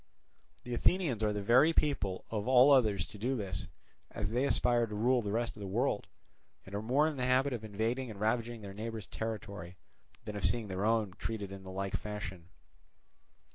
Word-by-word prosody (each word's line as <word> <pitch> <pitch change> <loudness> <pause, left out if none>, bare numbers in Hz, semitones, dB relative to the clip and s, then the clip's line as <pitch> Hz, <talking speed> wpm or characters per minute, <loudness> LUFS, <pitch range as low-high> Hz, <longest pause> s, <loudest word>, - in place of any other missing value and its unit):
The 125 - -5
Athenians 140 - +1
are 105 -1 +2
the 105 -1 -3
very 130 +10 +5
people 135 -13 0
of 105 -1 -2
all 130 +2 +7
others 105 -10 +4
to 105 - -12
do 125 +5 0
this, 95 - -3 0.4
as 100 - -3
they 125 +4 +1
aspire 120 -3 +3
to 105 - -6
rule 120 +4 +3
the 105 -2 -3
rest 115 +2 -1
of 105 - -11
the 100 - -4
world, 95 - 0 0.6
and 95 - -12
are 100 - -2
more 135 +7 +3
in 155 -3 -3
the 125 - 0
habit 130 +2 +3
of 115 -3 -4
invading 115 +5 -2
and 105 -3 -8
ravaging 115 +1 -1
their 100 -1 -8
neighbours' 110 0 -5
territory, 100 -6 -6 0.5
than 105 -1 -5
of 100 - -5
seeing 115 -4 +2
their 95 +2 -2
own 110 -4 +2
treated 105 -4 -4
in 95 0 -8
the 95 - -10
like 95 +1 -3
fashion. 95 -5 -6
110 Hz, 200 wpm, -32 LUFS, 100-125 Hz, 0.6 s, all